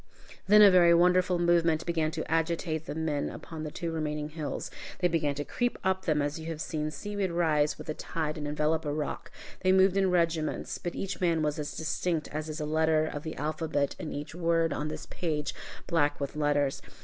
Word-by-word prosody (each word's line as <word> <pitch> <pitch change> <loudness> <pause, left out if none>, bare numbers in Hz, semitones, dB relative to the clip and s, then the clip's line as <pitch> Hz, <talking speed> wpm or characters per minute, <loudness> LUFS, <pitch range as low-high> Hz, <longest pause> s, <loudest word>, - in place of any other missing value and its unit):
Then 210 +1 +8
a 200 - +9
very 175 -2 +6
wonderful 180 +1 +4
movement 170 -2 +2
began 160 -2 0
to 160 0 -4
agitate 165 -1 -1
the - - -4
men 155 -3 -1
upon 160 -2 -8
the 155 - -4
two 165 +2 -4
remaining 150 -2 -2
hills. 155 -1 -5 0.3
They 180 - +2
began 155 -4 0
to 145 +1 -3
creep 245 0 -1
up 190 0 0
them 150 -3 +2
as 145 +2 -2
you 160 - -7
have 165 -2 -4
seen 155 -1 -2
seaweed 195 +6 -3
rise 155 -3 +2
with - - -9
the 155 - -3
tide 155 -1 -3
and 150 -2 -4
envelop 150 +2 0
a 145 - -2
rock. 150 0 -3 0.3
They 185 - +3
moved 190 0 +5
in 195 -1 +3
regiments, 165 -3 0
but 175 - -4
each 195 0 -4
man 165 -3 +2
was 150 0 -1
as 150 0 -4
distinct 160 0 -1
as 155 +1 -4
is 155 - -5
a 150 - -2
letter 155 0 +2
of 145 -2 -4
the 160 0 -6
alphabet 150 -1 -1
in 155 - -5
each 145 +2 -6
word 165 -1 +1
on 150 - -2
this 155 - -6
page, 150 -4 -2 0.3
black 150 -4 +1
with 140 0 -4
letters. 145 -2 +1
160 Hz, 210 wpm, -29 LUFS, 150-170 Hz, 0.3 s, a